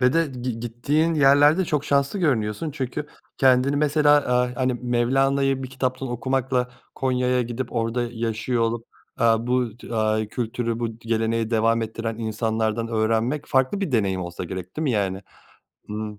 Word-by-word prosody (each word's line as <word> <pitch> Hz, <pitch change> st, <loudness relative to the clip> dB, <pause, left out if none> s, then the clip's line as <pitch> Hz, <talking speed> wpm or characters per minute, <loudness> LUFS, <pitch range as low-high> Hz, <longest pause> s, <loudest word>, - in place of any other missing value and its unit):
ve 125 Hz, 0 st, +4 dB
de 165 Hz, 0 st, +2 dB
git 125 Hz, -4 st, -5 dB
gittiğin 145 Hz, +8 st, 0 dB
yerlerde 145 Hz, +4 st, +5 dB
çok 150 Hz, -4 st, -1 dB
şanslı 140 Hz, +7 st, +1 dB
görünüyorsun 125 Hz, -, 0 dB
çünkü 140 Hz, 0 st, -4 dB, 0.3 s
kendini 130 Hz, +1 st, +4 dB
mesela, 150 Hz, 0 st, +3 dB
aaa, 125 Hz, -3 st, +1 dB
hani, 130 Hz, 0 st, +1 dB
Mevlana'yı 135 Hz, +3 st, +1 dB
bir 130 Hz, -, -6 dB
kitaptan 130 Hz, 0 st, -2 dB
okumakla 125 Hz, +1 st, -1 dB, 0.3 s
Konya'ya 125 Hz, -1 st, +1 dB
gidip 120 Hz, +1 st, -5 dB
orada 115 Hz, +1 st, 0 dB
yaşıyor 115 Hz, +1 st, -1 dB
olup, 115 Hz, 0 st, -1 dB, 0.3 s
aaa, 115 Hz, 0 st, +3 dB
bu 125 Hz, -3 st, 0 dB
t 120 Hz, -, -8 dB
aaa, 110 Hz, -1 st, +1 dB
bu 110 Hz, -, -6 dB
kültürü 115 Hz, 0 st, -2 dB
bu 115 Hz, -1 st, -3 dB
geleneği 115 Hz, 0 st, -1 dB
devam 115 Hz, 0 st, +2 dB
ettiren 115 Hz, 0 st, -4 dB
insanlardan 110 Hz, 0 st, -1 dB
öğrenmek 115 Hz, +5 st, 0 dB
farklı 130 Hz, +9 st, +1 dB
bir 185 Hz, -8 st, -2 dB
deneyim 100 Hz, -5 st, +1 dB
olsa 85 Hz, -1 st, -6 dB
gerek 95 Hz, -1 st, -7 dB
değil 155 Hz, -, -2 dB
mi 140 Hz, -, +1 dB
yani? 100 Hz, -3 st, -1 dB, 0.7 s
Imm. 105 Hz, 0 st, -5 dB
120 Hz, 160 wpm, -23 LUFS, 115-135 Hz, 0.7 s, yerlerde